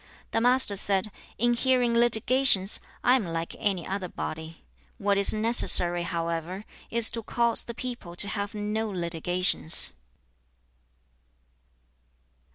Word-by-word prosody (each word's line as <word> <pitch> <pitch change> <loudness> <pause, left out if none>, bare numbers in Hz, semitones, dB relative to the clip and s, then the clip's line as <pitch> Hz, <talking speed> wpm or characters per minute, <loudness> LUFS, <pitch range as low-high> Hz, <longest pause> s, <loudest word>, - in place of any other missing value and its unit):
The 225 - -1
Master 245 -3 +2
said, 200 +1 -1 0.3
'In 240 +2 +1
hearing 250 -1 0
litigations, 235 -3 +4 0.2
I 250 - +3
am 255 - -1
like 165 0 -6
any 190 -5 -2
other 190 -1 -5
body. 160 -1 -9 0.3
What 200 -3 -1
is 200 0 +5
necessary, 215 -6 +4
however, 170 +3 -5 0.2
is 235 -1 -1
to 230 - -4
cause 235 +1 0
the 235 - -9
people 240 -9 -8
to 200 - -3
have 205 0 -5
no 210 +1 -4
litigations.' 175 - +1
205 Hz, 120 wpm, -25 LUFS, 175-235 Hz, 0.3 s, is